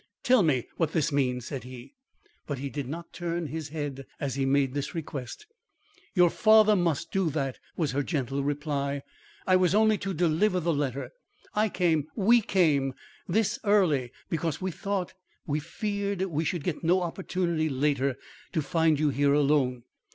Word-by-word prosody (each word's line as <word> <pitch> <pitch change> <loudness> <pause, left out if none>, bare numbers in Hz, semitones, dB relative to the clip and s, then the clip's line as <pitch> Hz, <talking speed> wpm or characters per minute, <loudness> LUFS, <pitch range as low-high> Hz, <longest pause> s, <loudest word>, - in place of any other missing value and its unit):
"Tell 250 -2 +5
me 140 -9 +1
what 165 -2 0
this 160 0 +1
means," 125 -4 0
said 135 -1 -5
he, 125 - -11 0.5
but 145 - -3
he 140 +1 -5
did 145 -4 -4
not 170 +3 -7
turn 170 -1 -3
his 155 0 -5
head 145 -3 -5
as 140 -3 -2
he 135 0 0
made 135 -1 +2
this 145 +4 -3
request. 145 - -6 0.7
"Your 175 -2 +5
father 215 -1 +6
must 170 -3 0
do 190 -4 +1
that," 135 -3 -2 0.2
was 155 -5 0
her 140 +2 0
gentle 140 -2 -2
reply. 140 -1 -2 0.4
"I 185 -1 +5
was 185 +1 +2
only 215 -1 +4
to 195 -1 -3
deliver 175 +4 +2
the 170 -1 0
letter. 140 -2 -2 0.4
I 215 +1 +2
came 165 -6 +1
we 230 +3 +5
came 150 -10 +2 0.3
thus 215 +4 +1
early, 175 - +3 0.2
because 160 -2 -2
we 190 0 -2
thought 195 +1 -3 0.3
we 150 0 -1
feared 200 +4 -3
we 165 -4 -1
should 170 -1 -2
get 170 -1 -3
no 180 +3 +3
opportunity 170 -2 -1
later 140 -1 +1 0.4
to 160 - 0
find 160 0 +2
you 150 -1 +3
here 140 0 +2
alone. 140 -4 +2
155 Hz, 170 wpm, -28 LUFS, 140-180 Hz, 0.7 s, father